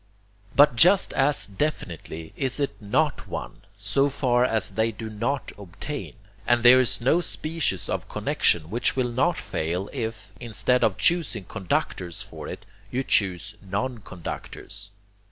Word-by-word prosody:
But 145 Hz, -2 st, +6 dB
just 185 Hz, +9 st, +5 dB
as 140 Hz, +2 st, +3 dB
definitely 90 Hz, -, -4 dB
is 135 Hz, 0 st, -2 dB
it 140 Hz, -4 st, 0 dB
NOT 100 Hz, -1 st, 0 dB
one, -, -, -6 dB, 0.2 s
so 110 Hz, +7 st, +1 dB
far 125 Hz, -3 st, +2 dB
as 110 Hz, -5 st, +1 dB
they 110 Hz, +3 st, +1 dB
do 110 Hz, 0 st, -7 dB
not 135 Hz, +6 st, -2 dB
obtain; 100 Hz, +10 st, -7 dB, 0.3 s
and 120 Hz, -1 st, +3 dB
there 125 Hz, +1 st, +9 dB
is 125 Hz, -1 st, +2 dB
no 150 Hz, +8 st, +3 dB
species 155 Hz, -, -2 dB
of -, -, -3 dB
connexion 85 Hz, 0 st, +1 dB
which 120 Hz, +3 st, +1 dB
will 125 Hz, -2 st, 0 dB
not 160 Hz, +8 st, +1 dB
fail, 90 Hz, +5 st, -3 dB
if, 110 Hz, -6 st, -5 dB
instead 125 Hz, +2 st, +1 dB
of 100 Hz, -4 st, +2 dB
choosing 170 Hz, -, +1 dB
conductors 90 Hz, -3 st, -2 dB
for -, -, -9 dB
it, 95 Hz, -, -8 dB, 0.2 s
you 130 Hz, +4 st, -1 dB
choose 100 Hz, -2 st, +1 dB
non 105 Hz, +6 st, -3 dB
conductors. 100 Hz, +2 st, -8 dB
115 Hz, 145 wpm, -25 LUFS, 100-135 Hz, 0.3 s, there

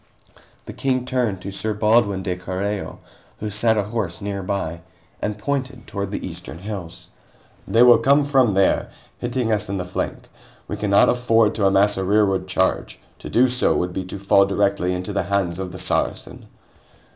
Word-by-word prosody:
The -, -, -8 dB
King 130 Hz, -2 st, -1 dB
turned 125 Hz, -7 st, -1 dB
to 100 Hz, -, -5 dB
Sir 105 Hz, +2 st, -2 dB
Baldwin 105 Hz, -2 st, +2 dB
de 90 Hz, 0 st, -2 dB
Carreo, 95 Hz, +3 st, -4 dB, 0.4 s
who 105 Hz, 0 st, -4 dB
sat 110 Hz, +2 st, +2 dB
ahorse 105 Hz, -4 st, -2 dB
nearby, 100 Hz, -4 st, -3 dB, 0.4 s
and 105 Hz, 0 st, -2 dB
pointed 130 Hz, +2 st, -3 dB
toward 100 Hz, -1 st, -4 dB
the 100 Hz, -, -4 dB
eastern 85 Hz, -1 st, -7 dB
hills. 95 Hz, -3 st, -7 dB, 0.6 s
"They 115 Hz, +2 st, +5 dB
will 120 Hz, -2 st, +7 dB
come 140 Hz, +4 st, +3 dB
from 130 Hz, -8 st, +3 dB
there, 95 Hz, -1 st, +2 dB, 0.3 s
hitting 120 Hz, -1 st, -1 dB
us 105 Hz, -3 st, 0 dB
in 100 Hz, -, -2 dB
the 90 Hz, -, -3 dB
flank; 90 Hz, -, -4 dB, 0.4 s
we -, -, -4 dB
cannot 100 Hz, -1 st, +3 dB
afford 115 Hz, -3 st, +3 dB
to 100 Hz, -3 st, +2 dB
amass 100 Hz, +1 st, +3 dB
a 95 Hz, -, -1 dB
rearward 95 Hz, -1 st, +2 dB
charge. 95 Hz, 0 st, -1 dB, 0.2 s
To -, -, -8 dB
do 125 Hz, +2 st, +4 dB
so 125 Hz, 0 st, +1 dB
would 90 Hz, 0 st, -1 dB
be 95 Hz, -, -3 dB
to 95 Hz, -, -7 dB
fall 100 Hz, 0 st, +4 dB
directly 100 Hz, -2 st, 0 dB
into 90 Hz, +3 st, -5 dB
the 100 Hz, -, +1 dB
hands 95 Hz, -3 st, 0 dB
of 95 Hz, -1 st, -4 dB
the 90 Hz, -, -8 dB
Saracen." -, -, -2 dB
100 Hz, 175 wpm, -22 LUFS, 95-115 Hz, 0.6 s, will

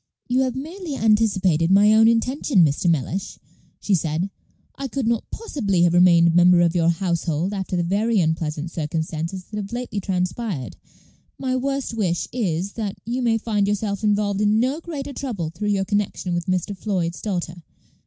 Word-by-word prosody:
"You 250 Hz, +1 st, +1 dB
have 260 Hz, -2 st, 0 dB
merely 320 Hz, +3 st, -6 dB
anticipated 195 Hz, -8 st, +2 dB
my 205 Hz, +3 st, +6 dB
own 220 Hz, +1 st, +6 dB
intention, 230 Hz, -, +3 dB
Mr. 150 Hz, +4 st, +1 dB
Mellish," 170 Hz, +6 st, -2 dB, 0.4 s
she 205 Hz, -, -1 dB
said. 165 Hz, +2 st, 0 dB, 0.4 s
"I 275 Hz, -, -5 dB
could 265 Hz, 0 st, -3 dB
not 230 Hz, -1 st, -1 dB
possibly 205 Hz, -, -1 dB
have 175 Hz, -1 st, +3 dB
remained 175 Hz, -1 st, +6 dB
a -, -, +4 dB
member 175 Hz, +1 st, +5 dB
of 170 Hz, -1 st, +3 dB
your 170 Hz, -2 st, +2 dB
household 170 Hz, 0 st, -1 dB
after 190 Hz, -2 st, -3 dB
the 175 Hz, -, +1 dB
very 210 Hz, +5 st, +1 dB
unpleasant 160 Hz, -1 st, -1 dB
circumstances 160 Hz, +3 st, -3 dB
that 210 Hz, -, -8 dB
have 200 Hz, 0 st, -5 dB
lately 240 Hz, -3 st, -3 dB
transpired. 180 Hz, -, -3 dB, 0.6 s
My 255 Hz, -1 st, -1 dB
worst 275 Hz, 0 st, -2 dB
wish 185 Hz, -6 st, -1 dB
is, 195 Hz, -5 st, -1 dB
that 210 Hz, -4 st, -4 dB
you 245 Hz, +3 st, -2 dB
may 230 Hz, -2 st, +2 dB
find 210 Hz, -3 st, 0 dB
yourself 205 Hz, 0 st, -2 dB
involved 205 Hz, -1 st, +1 dB
in 210 Hz, +1 st, +3 dB
no 260 Hz, +6 st, 0 dB
greater 290 Hz, -5 st, -6 dB
trouble 205 Hz, -, -4 dB
through 190 Hz, +6 st, -4 dB
your 195 Hz, -1 st, +1 dB
connection 205 Hz, -3 st, -1 dB
with 175 Hz, +2 st, -2 dB
Mr. 185 Hz, +2 st, -1 dB
Floyd's 185 Hz, -4 st, -2 dB
daughter. 175 Hz, -4 st, -3 dB
200 Hz, 175 wpm, -22 LUFS, 175-225 Hz, 0.6 s, my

